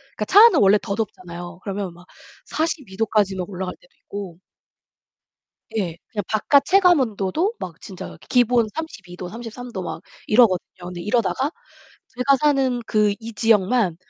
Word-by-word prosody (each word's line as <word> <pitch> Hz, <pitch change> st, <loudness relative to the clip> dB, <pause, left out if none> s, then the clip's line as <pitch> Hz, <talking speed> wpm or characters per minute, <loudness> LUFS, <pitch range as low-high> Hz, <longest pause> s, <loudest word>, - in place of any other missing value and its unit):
그니까 210 Hz, -, -2 dB
차 405 Hz, -, +7 dB
안은 470 Hz, -, +5 dB
원래 200 Hz, +1 st, +6 dB
더 200 Hz, -, -3 dB
덥잖아요. 175 Hz, -5 st, -6 dB
그러면 195 Hz, -2 st, -4 dB
막 175 Hz, +1 st, -17 dB, 0.4 s
42 310 Hz, -, -3 dB
도까지 210 Hz, -3 st, +1 dB
막 180 Hz, 0 st, -4 dB
올라갈 185 Hz, -1 st, -5 dB
때도 180 Hz, -, -25 dB
있고 195 Hz, -4 st, -7 dB, 1.4 s
예, 175 Hz, -6 st, -2 dB
그냥 205 Hz, -, -3 dB
바깥 270 Hz, +6 st, +3 dB
체감 365 Hz, -1 st, +5 dB
온도도 230 Hz, -, 0 dB
막 170 Hz, -3 st, -7 dB
진짜 190 Hz, -3 st, -9 dB
기본 245 Hz, -2 st, +4 dB
32 215 Hz, -, -7 dB
도, 180 Hz, -, -6 dB
33 235 Hz, +3 st, -8 dB
도 190 Hz, -, -4 dB
막 170 Hz, -, -5 dB, 0.3 s
이러거든요. 215 Hz, -5 st, +4 dB, 0.2 s
근데 175 Hz, -1 st, -6 dB
이러다가 245 Hz, +6 st, 0 dB, 0.6 s
제가 260 Hz, +2 st, +2 dB
사는 270 Hz, -4 st, +2 dB
그 210 Hz, -1 st, +2 dB
이 230 Hz, +1 st, -7 dB
지역만 210 Hz, -4 st, +2 dB
210 Hz, 280 characters per minute, -22 LUFS, 185-250 Hz, 1.4 s, 차